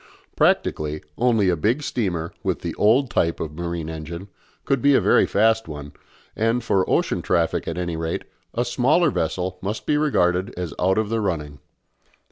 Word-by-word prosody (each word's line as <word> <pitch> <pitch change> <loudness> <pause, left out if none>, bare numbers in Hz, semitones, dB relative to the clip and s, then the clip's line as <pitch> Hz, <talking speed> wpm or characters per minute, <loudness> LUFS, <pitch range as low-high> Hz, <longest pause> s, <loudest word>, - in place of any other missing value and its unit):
Practically, 75 0 +1
only 115 -5 +2
a 90 - +2
big 115 - 0
steamer, 85 - -2
with - - -2
the - - -3
old 120 +5 +3
type 85 -6 +1
of 80 -2 -4
marine 85 -1 -4
engine, 80 +4 -7 0.4
could 135 -3 +1
be 140 +1 +5
a - - +6
very - - +4
fast 110 +1 +2
one, 75 -2 -8 0.4
and, 115 +2 +1
for 95 -4 +1
ocean - - +1
traffic 85 -2 0
at 85 - -3
any 85 -2 -2
rate, 80 0 -3 0.3
a 120 - +1
smaller 140 +7 +3
vessel 90 +2 -2
must 105 +3 -4
be 150 - +2
regarded 95 -11 +1
as 90 -4 -4
out 95 +2 +2
of 110 -1 0
the 115 0 0
running. 75 -7 -3
95 Hz, 175 wpm, -23 LUFS, 80-115 Hz, 0.4 s, a